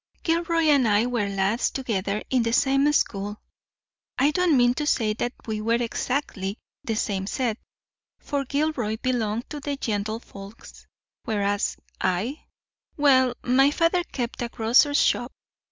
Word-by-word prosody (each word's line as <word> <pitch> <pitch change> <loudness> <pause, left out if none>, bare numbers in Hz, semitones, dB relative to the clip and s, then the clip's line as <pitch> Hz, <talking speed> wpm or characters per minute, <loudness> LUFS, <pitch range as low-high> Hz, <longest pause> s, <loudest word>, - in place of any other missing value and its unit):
"Gilroy 335 0 +1
and 285 -6 +4
I 210 +2 +3
were 235 -5 -1
lads 195 +4 0
together 210 -6 -2
in 255 -2 +3
the 230 0 -1
same 275 +3 +3
school. 205 -7 -1 0.8
I 280 +3 +3
don't 345 -3 +3
mean 245 0 +4
to 295 +3 -3
say 220 -7 +2
that 240 +3 -3
we 215 -2 -3
were 230 +2 +2
exactly 240 -3 -2
in 200 - -5 0.3
the 225 - -2
same 195 -3 -2
set, 235 -1 -1 0.6
for 285 -1 -2
Gilroy 275 -6 -1
belonged 235 -3 -1
to 295 -2 -5
gentlefolks, 220 -5 -5 0.4
whereas 205 -4 0 0.2
I—well, 260 - 0
my 270 +3 +4
father 330 +4 +1
kept 245 -6 -5
a 240 - -2
grocer's 245 +6 +3
shop. 245 +1 +2
245 Hz, 135 wpm, -25 LUFS, 215-280 Hz, 0.8 s, and